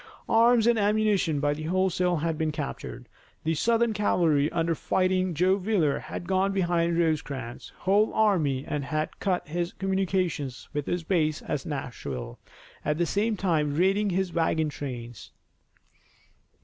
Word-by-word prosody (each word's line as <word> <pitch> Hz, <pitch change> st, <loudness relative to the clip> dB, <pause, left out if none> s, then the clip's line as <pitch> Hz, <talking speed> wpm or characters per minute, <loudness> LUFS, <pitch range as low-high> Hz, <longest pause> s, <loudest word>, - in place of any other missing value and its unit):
Arms 230 Hz, 0 st, +5 dB
and 235 Hz, -1 st, +4 dB
ammunition 205 Hz, -7 st, +2 dB
by 145 Hz, 0 st, +1 dB
the 150 Hz, -, -7 dB
wholesale 180 Hz, +1 st, +1 dB
had 160 Hz, +1 st, -1 dB
been 155 Hz, 0 st, -1 dB
captured. 65 Hz, -, -6 dB, 0.4 s
The 160 Hz, -, +1 dB
Southern 230 Hz, +7 st, +2 dB
cavalry 165 Hz, -8 st, +2 dB
under 165 Hz, 0 st, 0 dB
Fighting 185 Hz, +1 st, 0 dB
Joe 185 Hz, +5 st, +3 dB
Wheeler 185 Hz, -7 st, +1 dB
had -, -, -7 dB
gone 190 Hz, +1 st, +2 dB
behind 170 Hz, -3 st, +1 dB
Rosecrans' 145 Hz, -7 st, -2 dB
whole 205 Hz, +3 st, +3 dB
army 160 Hz, -11 st, +2 dB
and 150 Hz, -2 st, -2 dB
had 155 Hz, +1 st, -3 dB
cut 185 Hz, -5 st, -1 dB
his 170 Hz, +3 st, -2 dB
communications 185 Hz, -8 st, -1 dB
with 145 Hz, -1 st, -3 dB
his 175 Hz, -1 st, -1 dB
base 155 Hz, -3 st, 0 dB
at 150 Hz, +3 st, -3 dB
Nashville, 70 Hz, -, -5 dB, 0.4 s
at 150 Hz, 0 st, 0 dB
the 175 Hz, -, +2 dB
same 215 Hz, +4 st, 0 dB
time 155 Hz, -6 st, 0 dB
raiding 195 Hz, +5 st, +2 dB
his 185 Hz, -1 st, -1 dB
wagon 160 Hz, -2 st, +1 dB
trains. 120 Hz, -6 st, -7 dB
170 Hz, 145 wpm, -27 LUFS, 150-190 Hz, 0.4 s, Arms